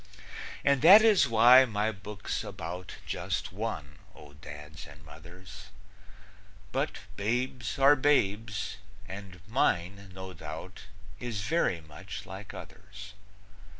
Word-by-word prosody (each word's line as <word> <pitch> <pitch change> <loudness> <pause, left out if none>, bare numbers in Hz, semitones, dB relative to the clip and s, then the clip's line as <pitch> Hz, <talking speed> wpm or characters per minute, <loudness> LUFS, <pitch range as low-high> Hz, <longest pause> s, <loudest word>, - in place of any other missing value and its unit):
And 140 -2 +3
that 195 +8 +9
is 210 - +5
why 120 +3 +8
my 110 -2 -1
book's 105 0 -5
about 90 +2 -7
Just - - -3
one, 85 -10 -5 0.2
O 75 -1 -14
Dads 75 +3 -11
and 75 0 -15
Mothers; 85 +5 -13 1.0
But - - -2 0.2
babes 120 +2 -2
are 140 +2 +6
babes, 110 -7 0 0.3
and 95 -2 -9
mine, 100 -4 0
no 95 0 -8
doubt, 80 +3 -9 0.3
Is 115 -5 -4
very 105 - 0
much 85 +6 -9
like 100 +2 -9
others. 100 0 -11
100 Hz, 115 wpm, -29 LUFS, 85-115 Hz, 1.0 s, that